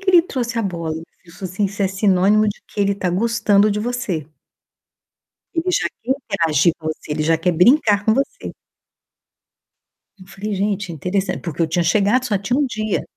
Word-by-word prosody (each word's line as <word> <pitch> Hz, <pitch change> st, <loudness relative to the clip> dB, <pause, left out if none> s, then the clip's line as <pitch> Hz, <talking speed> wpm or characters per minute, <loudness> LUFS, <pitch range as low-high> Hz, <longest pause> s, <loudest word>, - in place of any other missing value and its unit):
que 390 Hz, -1 st, +1 dB
ele 350 Hz, -2 st, +7 dB
trouxe 245 Hz, -7 st, -3 dB
a -, -, +1 dB
bola?" 170 Hz, -4 st, -3 dB
E -, -, -6 dB
o -, -, -10 dB
meu -, -, -14 dB, 0.2 s
filho 170 Hz, 0 st, -16 dB
falou 185 Hz, -2 st, -6 dB
assim: 205 Hz, +2 st, 0 dB
"Isso 200 Hz, +1 st, -2 dB
é 195 Hz, -, +2 dB
sinônimo 195 Hz, +2 st, +3 dB
de 205 Hz, -, -5 dB
que -, -, -13 dB
ele 200 Hz, 0 st, +2 dB
tá 190 Hz, -2 st, -2 dB
gostando 210 Hz, +1 st, +2 dB
de 210 Hz, +1 st, -1 dB
você." 210 Hz, -10 st, -3 dB, 1.3 s
Ele 335 Hz, +2 st, 0 dB
já -, -, +1 dB, 0.2 s
quer 255 Hz, +3 st, +1 dB
interagir 170 Hz, -, +1 dB
com 155 Hz, -, -5 dB
você, 155 Hz, -1 st, -5 dB
ele 155 Hz, -, -1 dB
já 160 Hz, +1 st, +3 dB
quer 175 Hz, +2 st, +1 dB
brincar 205 Hz, -, +4 dB
com 220 Hz, +1 st, +3 dB
você. 275 Hz, -, -3 dB, 1.7 s
Eu 185 Hz, -, -14 dB
falei: 200 Hz, +2 st, -5 dB
"Gente, 200 Hz, -2 st, -2 dB
interessan", 185 Hz, +5 st, -1 dB
porque 170 Hz, -2 st, -5 dB
eu -, -, +2 dB
tinha 175 Hz, +2 st, +1 dB
chegado 210 Hz, +7 st, +2 dB
só 210 Hz, -5 st, 0 dB
tinha 240 Hz, +7 st, -1 dB
1 290 Hz, -, +2 dB
dia. 215 Hz, -4 st, -2 dB
200 Hz, 205 wpm, -20 LUFS, 180-230 Hz, 1.7 s, ele